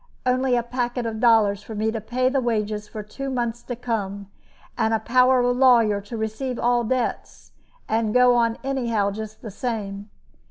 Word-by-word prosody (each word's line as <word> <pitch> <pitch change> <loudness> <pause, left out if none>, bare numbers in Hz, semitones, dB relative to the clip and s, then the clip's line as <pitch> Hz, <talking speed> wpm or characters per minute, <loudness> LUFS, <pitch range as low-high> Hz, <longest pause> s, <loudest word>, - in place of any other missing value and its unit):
Only 255 0 +2
a 240 - +1
packet 245 0 -2
of 220 -1 -3
dollars 220 -4 +4
for 220 - -9
me 215 +1 0
to 225 -1 -4
pay 255 +4 0
the 265 +1 +1
wages 215 -3 -2
for 215 0 -7
two 270 +6 -6
months 240 -2 -2
to 245 - -6
come, 200 -4 -4 0.4
and 220 0 +1
a - - 0
power 255 +2 +4
of 245 0 +1
lawyer 235 -6 +4
to 205 +4 -7
receive 220 +4 -3
all 240 0 +2
debts, 250 +1 -3 0.4
and 220 -1 0
go 250 +1 +5
on 230 -1 +2
anyhow 235 -7 0
just 220 +1 -8
the 220 - -6
same. 205 -3 -4
230 Hz, 185 wpm, -23 LUFS, 215-250 Hz, 0.4 s, go